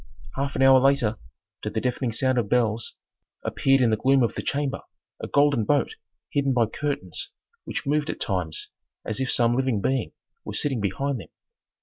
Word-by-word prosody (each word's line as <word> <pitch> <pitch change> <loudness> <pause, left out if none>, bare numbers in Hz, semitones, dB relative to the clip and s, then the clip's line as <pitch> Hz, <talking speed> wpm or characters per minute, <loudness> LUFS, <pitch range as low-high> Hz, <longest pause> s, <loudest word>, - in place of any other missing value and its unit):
Half 140 +1 -2
an - - +2
hour 135 0 +8
later, 130 -5 +2 0.4
to - - -3
the - - -2
deafening 125 -1 -1
sound 130 +2 +1
of 105 -4 -2
bells, 115 -2 +1 0.5
appeared 135 0 +2
in 120 -3 +4
the - - +4
gloom 135 +4 +3
of 115 - +1
the - - -4
chamber 140 -1 -2 0.4
a - - -4
golden 140 -5 +3
boat 145 - +1 0.4
hidden 140 -2 +1
by 120 -2 +3
curtains 110 - -4 0.4
which - - -4
moved 150 +2 +1
at - - -3
times 90 -6 -2 0.3
as 110 - -3
if 130 -1 -1
some 120 0 +3
living 130 -4 +1
being 130 +4 -1 0.3
were - - -6
sitting 135 -6 0
behind 125 +7 -1
them. 90 - -11
130 Hz, 185 wpm, -25 LUFS, 115-140 Hz, 0.5 s, hour